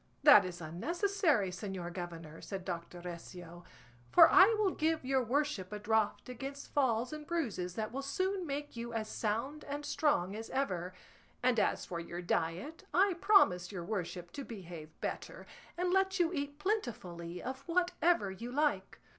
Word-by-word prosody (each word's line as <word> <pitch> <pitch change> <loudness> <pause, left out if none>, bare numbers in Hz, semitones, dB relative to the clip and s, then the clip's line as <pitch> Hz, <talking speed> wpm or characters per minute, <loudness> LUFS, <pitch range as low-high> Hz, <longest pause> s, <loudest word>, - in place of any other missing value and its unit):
"That 290 -9 +9
is 175 -1 -6
unnecessary, 305 - +1
señor 180 -2 -5
governor," 165 -3 -7
said 190 -2 -6
Doctor 175 -1 -5
Recio, 175 0 -8 0.5
"for - - +9
I 375 0 +9
will 415 -3 +2
give 320 -3 0
your 265 -1 +2
worship 250 -6 -1
a 210 - -3
draught 215 0 0
against 270 +3 -7
falls 250 -1 +1
and 305 0 -7
bruises 210 - -2
that 215 -1 -3
will 270 +3 -3
soon 370 +6 -1
make 290 0 -4
you 235 0 -5
as 220 -1 -2
sound 230 +9 -2
and 290 +1 -5
strong 205 - +1
as 225 +1 -6
ever; 185 -10 -2 0.5
and 250 -2 +3
as - - +1
for 170 - -4
your 170 +1 -6
diet 175 - -2
I 385 +1 +4
promise 180 - +5
your 180 -4 -5
worship 180 -3 -4
to 280 - -6
behave 175 -9 -8
better, - - -5 0.3
and 360 +1 +1
let 385 0 +2
you 345 0 +2
eat 285 -2 -3
plentifully 220 - -3
of 260 +1 -4
whatever 345 - +2
you 230 +6 -7
like." 295 +3 0
235 Hz, 165 wpm, -33 LUFS, 180-300 Hz, 0.5 s, That